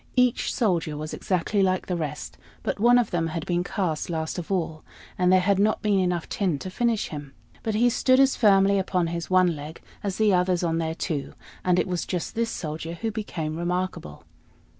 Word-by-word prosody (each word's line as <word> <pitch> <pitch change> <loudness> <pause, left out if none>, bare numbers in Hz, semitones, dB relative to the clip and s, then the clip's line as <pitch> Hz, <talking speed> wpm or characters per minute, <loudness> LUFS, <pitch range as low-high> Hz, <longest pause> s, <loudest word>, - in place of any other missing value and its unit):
Each 250 -1 +2
soldier 170 - 0
was 155 +1 -5
exactly 190 +2 0
like 185 -1 +1
the 180 - -2
rest; 155 -4 -4 0.3
but - - -2
one 240 +3 +6
of 245 - +1
them 165 -2 0
had 160 0 -4
been 175 0 0
cast 180 -5 -2
last 160 +1 -2
of 175 - -7
all, 160 -4 -2 0.3
and 180 -1 +2
there 185 - +6
had 195 +1 +2
not 215 +2 +2
been 205 -2 +3
enough 180 -2 0
tin 185 -7 0
to 185 +6 -7
finish 235 +1 0
him; 145 -3 -8 0.3
but 220 -2 -2
he 235 +3 +4
stood 255 +2 +3
as 270 0 +5
firmly 200 -2 +4
upon 185 -2 0
his 170 0 -4
one 185 -2 +4
leg 150 +2 -8 0.2
as 195 -2 -3
the 215 -2 +3
others 180 0 +2
on 165 -1 0
their 160 0 -2
two; 150 -5 -3 0.3
and 180 -1 +3
it - - +2
was 180 -2 -1
just 180 -3 -3
this 230 0 0
Soldier 160 -1 -5
who 225 +5 -3
became 170 -8 -4
remarkable. 175 - -3
180 Hz, 205 wpm, -25 LUFS, 165-200 Hz, 0.3 s, one